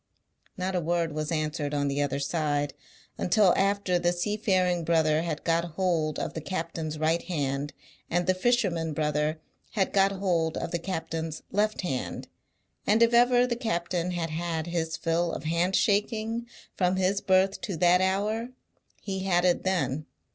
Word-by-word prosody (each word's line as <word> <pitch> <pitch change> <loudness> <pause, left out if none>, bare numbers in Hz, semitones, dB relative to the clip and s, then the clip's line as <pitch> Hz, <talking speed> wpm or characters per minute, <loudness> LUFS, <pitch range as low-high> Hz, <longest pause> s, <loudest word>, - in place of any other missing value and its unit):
Not 185 +1 -2
a 180 - +1
word 170 0 0
was 155 +1 -3
answered 155 -2 -1
on 145 0 +1
the 140 +1 0
other 140 -1 0
side, 145 -1 -1 0.5
until 185 0 +4
after 195 -2 +1
the 175 0 +2
seafaring 185 -2 +1
brother 160 -1 +2
had 165 -2 -3
got 165 0 +2
hold 170 -5 0
of - - -3
the 160 - -5
captain's 165 -2 -4
right 160 +2 +1
hand, 145 -4 -2 0.4
and 175 +1 +1
the 185 - +3
fisherman 185 -6 +1
brother 150 +1 0 0.3
had 195 -4 0
got 195 0 +4
hold 175 -5 0
of - - -3
the 170 - -1
captain's 165 -3 -4
left 215 +2 +1
hand; 135 -9 -3 0.6
and 220 +3 +5
if 230 0 +3
ever 245 +1 +5
the 245 -1 -1
captain 180 -6 -1
had 170 -3 -2
had 165 0 -2
his 165 -2 -2
fill 165 0 0
of - - -5
hand 170 +4 +1
shaking, 220 +2 +1 0.3
from 180 0 +2
his 190 +1 +1
birth 190 +1 +2
to 190 -5 -4
that 180 +2 +4
hour, 210 +5 0 0.5
he 190 -2 -3
had 175 -1 +2
it 175 -1 +3
then. 155 -6 -1
175 Hz, 165 wpm, -27 LUFS, 160-190 Hz, 0.6 s, and